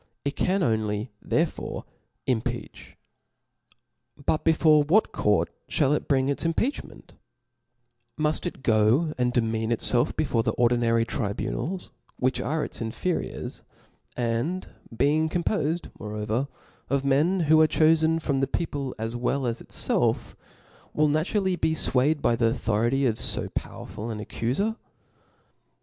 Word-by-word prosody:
It 140 - -1
can 190 +1 +1
only 110 -1 -1
therefore - - -2 0.4
impeach. 115 -3 -3 1.3
But 155 - +1
before 160 -2 +5
what 170 +10 +3
court 105 -1 +1 0.2
(hall 145 -1 +3
it 150 - -1
bring 135 -2 +2
its 140 - -1
impeachment; 195 - -2 1.1
muft 155 +3 +1
it 150 - -8
go 115 +9 +3
and 125 0 +2
demean, 115 -2 0
it&lf 120 +1 +2
before 135 -7 +1
the 110 -1 -1
ordinary 115 -1 +2
tribunals 120 - -3 0.3
which 130 +1 0
are 155 +1 -1
its - - -8
inferiors, 115 +10 -3 0.6
and 120 +10 -1 0.3
being 150 +5 +2
compofed 170 -1 -1
moreover 105 +5 -2 0.4
of 140 +1 0
men 155 +7 +3
who 155 0 +5
are 155 - +6
chofen 160 +1 +3
from 140 -4 -1
the 135 - +1
people 140 -3 -3
as 115 +1 -4
well 125 +3 -1
as 115 -1 -2
itfelf, - - 0 0.6
will 150 0 +3
naturally 185 +5 +1
be 160 -2 0
fwayed 145 +1 +3
by 120 - +3
the 115 0 +2
authority 115 +3 +1
of 115 -3 0
fo - - 0
pow - - -5
erful 115 +2 -6
an 110 - -4
accufer 130 - -2
135 Hz, 130 wpm, -26 LUFS, 115-160 Hz, 1.3 s, are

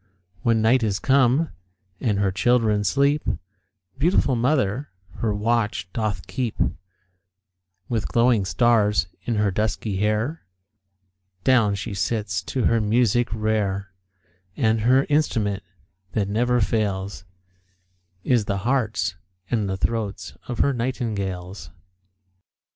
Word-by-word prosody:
When 115 -2 +2
night 120 +3 +4
is 105 -4 0
come, 135 +5 +3 0.5
and 105 -5 0
her 100 -1 +1
children 110 0 +2
sleep, 140 +8 +2 0.8
Beautiful 150 -4 +3
mother 130 0 0 0.3
her 110 - 0
watch 105 -3 -1
doth 105 -5 -2
keep; 125 -4 -3 1.3
With 115 -3 -1
glowing 120 -3 +3
stars 105 -3 +3 0.2
in 120 - 0
her 105 -1 +2
dusky 105 0 -1
hair 110 +10 0 1.0
Down 115 -5 +4
she 100 +2 -5
sits 100 -3 -1
to 130 - -2
her 115 0 +3
music 120 +2 +2
rare; 105 -3 -1 0.7
And 110 -4 +2
her 130 +4 +4
instrument 110 -10 +1 0.5
that 105 -3 0
never 120 +4 +1
fails, 100 -3 -1 1.0
Is 120 -5 +2
the 100 - -1
hearts 110 -7 0 0.4
and 110 -5 0
the 95 - -2
throats 110 0 -3
of 120 - -4
her 140 - +3
nightingales. 100 - -3
110 Hz, 115 wpm, -23 LUFS, 100-125 Hz, 1.3 s, night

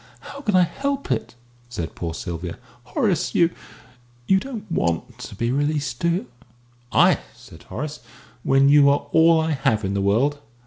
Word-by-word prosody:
"How 280 - -10
can 210 -8 0
I 180 - +6
help 275 - -3
it?" 115 -1 -2 0.3
said 85 -9 -5
poor 85 -2 -5
Sylvia. 85 0 -5 0.3
"Horace, - - 0
you 170 0 +4 0.7
you 190 +6 +4
don't 230 -3 -7
want 85 - -1
to - - -8
be 115 +4 -1
released, 145 -2 -1
do 170 - +1
you?" 180 +7 -1 0.7
"I?" - - +5 0.2
said - - -15
Horace, 150 +2 -5 0.4
"when 135 +2 +4
you 145 0 +6
are 145 0 +1
all 165 0 +5
I 160 0 0
have 110 -7 0
in 95 - -2
the 100 - 0
world! 125 +9 +1
145 Hz, 170 wpm, -22 LUFS, 110-170 Hz, 0.7 s, I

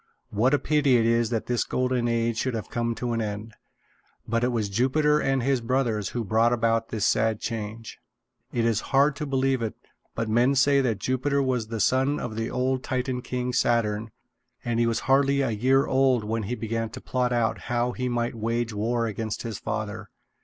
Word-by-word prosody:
What 120 +7 +3
a - - +3
pity 145 -4 +3
it 115 - +2
is 115 -1 +2
that 115 -2 -2
this 120 -1 0
Golden 125 -1 0
Age 115 0 0
should 130 -3 -1
have 110 - -5
come 115 -1 -1
to 120 0 -2
an 115 - -1
end! 105 +1 -5 0.7
But 115 +1 0
it - - +3
was 115 -4 -1
Jupiter 135 +8 +2
and 135 -3 0
his 135 -1 +1
brothers 115 -4 0
who 120 - -3
brought 110 +3 +2
about 115 -1 +1
the 110 - -4
sad 110 +1 +2
change. 110 0 -5 0.5
It 115 -1 0
is 115 -2 +1
hard 140 +1 +4
to 150 - -4
believe 135 -1 +1
it, 110 -2 -3 0.4
but 115 -1 -2
men 120 +5 +3
say 140 +1 +4
that 115 -6 0
Jupiter 130 +6 0
was 125 -4 -1
the 115 0 -4
son 130 +7 +2
of 110 -3 -5
the 115 +1 -2
old 130 +1 0
Titan 130 0 -2
king, 125 0 -3
Saturn, 115 -3 +1 0.6
and 120 -1 0
that - - +3
he 115 - +3
was 115 - 0
hardly 140 +1 +3
a 130 -4 0
year 130 +6 +3
old 130 -3 +2
when 110 +2 -2
he 125 - -1
began 115 -1 -3
to - - -9
plot 125 -1 -1 0.3
how 120 0 0
he 125 0 -3
might 120 -1 -1
wage 115 0 -2
war 115 +3 0
against 110 0 -4
his 115 -4 -5
father. 105 -1 -4
120 Hz, 205 wpm, -26 LUFS, 115-130 Hz, 0.7 s, hard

